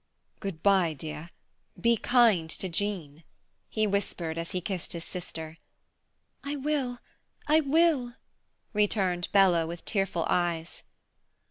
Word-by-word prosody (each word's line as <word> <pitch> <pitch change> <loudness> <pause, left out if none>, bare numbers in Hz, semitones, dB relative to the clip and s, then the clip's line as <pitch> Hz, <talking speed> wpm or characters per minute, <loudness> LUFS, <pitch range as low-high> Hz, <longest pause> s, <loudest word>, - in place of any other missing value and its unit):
"Good 190 -6 -6
bye, 190 -5 +4
dear. 155 +3 -7 0.5
Be 235 0 +4
kind 225 -8 +3
to 190 - -2
Jean," 170 -5 -3 0.5
he 215 -1 +1
whispered 190 -5 -1
as 165 - -4
he 185 - -2
kissed 180 0 -3
his 170 -1 -6
sister. 165 -3 -7 0.8
"I 285 +1 -3
will, 275 -3 -1 0.5
I 305 +1 +5
will," 290 -5 +2 0.6
returned 195 -4 +1
Bella, 180 -5 +4
with 170 +1 -7
tearful 195 -5 0
eyes. 170 -2 -1
190 Hz, 120 wpm, -28 LUFS, 165-235 Hz, 0.8 s, I